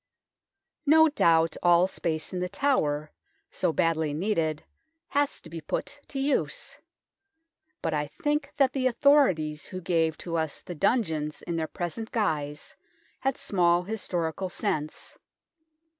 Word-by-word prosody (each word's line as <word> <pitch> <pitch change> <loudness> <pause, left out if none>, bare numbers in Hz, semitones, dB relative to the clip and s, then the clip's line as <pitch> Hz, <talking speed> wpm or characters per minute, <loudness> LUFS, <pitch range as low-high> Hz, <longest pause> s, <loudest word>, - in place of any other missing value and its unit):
No 320 +2 +7
doubt 165 - +3
all 175 0 +5
space 165 -3 -3
in 180 - -2
The 180 0 -2
Tower, 155 - 0 0.4
so 180 - 0
badly 160 -3 +1
needed, 160 -4 0 0.5
has 285 0 +1
to - - -12
be 165 0 -7
put 290 - -4
to 275 - -7
use, 290 - -1 1.0
but 160 - 0
I 150 -1 0
think 295 - -2
that 270 -2 +3
the 260 -2 +1
authorities 235 - +3
who 185 - -6
gave 165 -3 +1
to 170 -1 -3
us 160 -3 -2
the 175 - -6
dungeons 160 -6 0
in 170 - -3
their 160 -1 -1
present 185 +8 -5
guise 150 -9 -2 0.4
had 270 -1 0
small 175 -2 +2
historical 180 -3 -2
sense. 155 -3 -3
175 Hz, 135 wpm, -27 LUFS, 160-235 Hz, 1.0 s, No